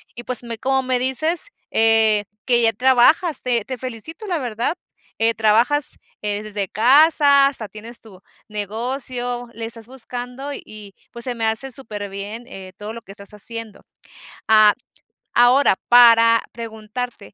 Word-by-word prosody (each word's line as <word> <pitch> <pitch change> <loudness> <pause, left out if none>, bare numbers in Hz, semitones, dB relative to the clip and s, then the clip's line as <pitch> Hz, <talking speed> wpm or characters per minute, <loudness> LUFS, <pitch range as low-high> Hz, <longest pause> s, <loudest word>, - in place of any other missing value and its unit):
y 240 - -8
pues, 250 -1 +1
me 230 -1 -6
como 265 +2 0
me 255 -1 0
dices, 310 - 0 0.2
eh, 220 -2 +3 0.2
que 240 -2 +3
ya 225 -1 +3
trabajas, 265 - +3
te 240 -4 -1
te 260 -1 -5
felicito, 255 - -8
la 350 -3 -1
verdad, 240 +4 -2 0.4
eh, 225 +1 +3
trabajas, 230 +7 +2 0.2
eh, 205 0 -2
desde 205 -2 -3
casa, 280 - +5
hasta 240 -7 -5
tienes 230 +3 -10
tu 195 -4 -16 0.3
negocio, 245 +3 -4
le 225 0 -6
estás 225 -1 -7
buscando 250 +2 -7
y, 210 -5 -11 0.2
pues, 235 0 -9
se 250 -2 -3
me 225 -1 -2
hace 225 +5 -1
superbién, 210 -1 -7
eh, 190 -6 -10
todo 210 +2 -7
lo 230 - -9
que 195 - -13
estás 200 0 -10
haciendo. 225 +1 -8 0.6
Ah, 215 -1 +6 0.6
ahora, 245 +1 +5 0.2
para 230 -1 +6
preguntarte, 230 +1 -7
235 Hz, 150 wpm, -20 LUFS, 215-255 Hz, 0.6 s, Ah